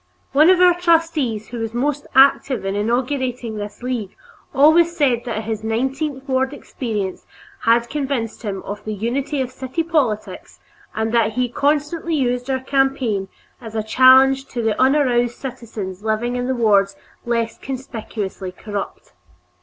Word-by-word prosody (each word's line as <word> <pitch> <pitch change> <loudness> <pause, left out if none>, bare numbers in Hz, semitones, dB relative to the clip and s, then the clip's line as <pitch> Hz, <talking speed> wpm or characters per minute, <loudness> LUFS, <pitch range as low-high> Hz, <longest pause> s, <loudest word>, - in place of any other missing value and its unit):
One 305 +5 +5
of 370 -1 +5
our 360 -1 +7
trustees 330 -10 +1
who 240 - -6
was 225 0 -4
most 285 +3 -1
active 270 -3 +4
in 195 - -1
inaugurating 245 +1 -1
this 205 +2 -7
League 235 -6 -3 0.4
always 330 +4 +4
said 255 -6 +2
that 225 -2 -3
his 220 0 -4
nineteenth 265 +5 -2
ward 265 +1 0
experience 210 -9 -5 0.4
had 230 +1 +4
convinced 270 -5 -3
him 200 -4 -4
of 205 +1 -7
the 215 0 -4
unity 265 +7 -2
of 255 -1 -3
city 260 +5 -3
politics, 280 -11 -2 0.4
and 220 0 -1
that 225 -2 +2
he 250 +2 0
constantly 300 +5 0
used 250 -2 -1
our 260 -1 0
campaign 260 -7 0 0.3
as 225 -2 -9
a 220 - -1
challenge 265 +4 +5
to 240 -2 -4
the 225 -1 0
unaroused 255 -3 +2
citizens 215 -7 -7
living 220 +3 -1
in 250 +1 -1
wards 200 -4 +3 0.3
less 230 -1 -2
conspicuously 220 -7 -5
corrupt. 205 +2 -7
245 Hz, 145 wpm, -20 LUFS, 220-275 Hz, 0.4 s, our